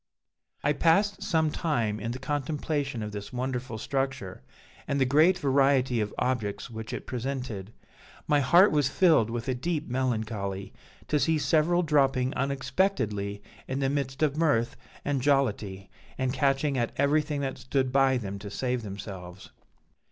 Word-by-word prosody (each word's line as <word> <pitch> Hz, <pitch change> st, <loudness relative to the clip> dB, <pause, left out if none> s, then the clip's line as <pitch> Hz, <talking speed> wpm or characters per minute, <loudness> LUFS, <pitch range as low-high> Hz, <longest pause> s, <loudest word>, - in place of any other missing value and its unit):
"I 145 Hz, -, +3 dB
passed 195 Hz, +7 st, +2 dB
some 160 Hz, -2 st, +1 dB
time 115 Hz, -12 st, -1 dB
in 110 Hz, +2 st, -4 dB
the 120 Hz, -, -3 dB
contemplation 145 Hz, -2 st, -2 dB
of 105 Hz, -, -5 dB
this 105 Hz, +2 st, -7 dB
wonderful 125 Hz, -2 st, -3 dB
structure, 135 Hz, -, -3 dB, 0.5 s
and 140 Hz, -, 0 dB
the 135 Hz, -, +4 dB
great 155 Hz, +8 st, +4 dB
variety 135 Hz, -5 st, +2 dB
of 105 Hz, -1 st, -2 dB
objects 120 Hz, -3 st, -2 dB
which 110 Hz, -1 st, -6 dB
it -, -, -5 dB
presented. 125 Hz, -5 st, -4 dB, 0.6 s
My 150 Hz, -1 st, +4 dB
heart 175 Hz, +9 st, +6 dB
was 145 Hz, -3 st, +2 dB
filled 155 Hz, -, +4 dB
with 120 Hz, +1 st, -4 dB
a 130 Hz, -, +1 dB
deep 150 Hz, +4 st, -2 dB
melancholy 110 Hz, -6 st, -2 dB, 0.3 s
to 150 Hz, -, +2 dB
see 160 Hz, +4 st, +2 dB
several 165 Hz, +4 st, +2 dB
dropping 135 Hz, -4 st, +2 dB
unexpectedly 135 Hz, -, -1 dB, 0.2 s
in 130 Hz, -, -2 dB
the 135 Hz, -1 st, +1 dB
midst 140 Hz, 0 st, -2 dB
of 145 Hz, -2 st, +2 dB
mirth 145 Hz, -8 st, +1 dB, 0.3 s
and 140 Hz, -2 st, 0 dB
jollity, 105 Hz, -8 st, 0 dB, 0.3 s
and 130 Hz, -1 st, 0 dB
catching 135 Hz, 0 st, +1 dB
at 120 Hz, -, -1 dB
everything 150 Hz, +1 st, +1 dB
that 135 Hz, -1 st, -3 dB
stood 130 Hz, -1 st, 0 dB
by 135 Hz, -1 st, +4 dB
them 100 Hz, -4 st, -5 dB
to 100 Hz, -, -7 dB
save 125 Hz, +4 st, -2 dB
themselves. 95 Hz, -3 st, -8 dB
130 Hz, 150 wpm, -28 LUFS, 115-145 Hz, 0.6 s, heart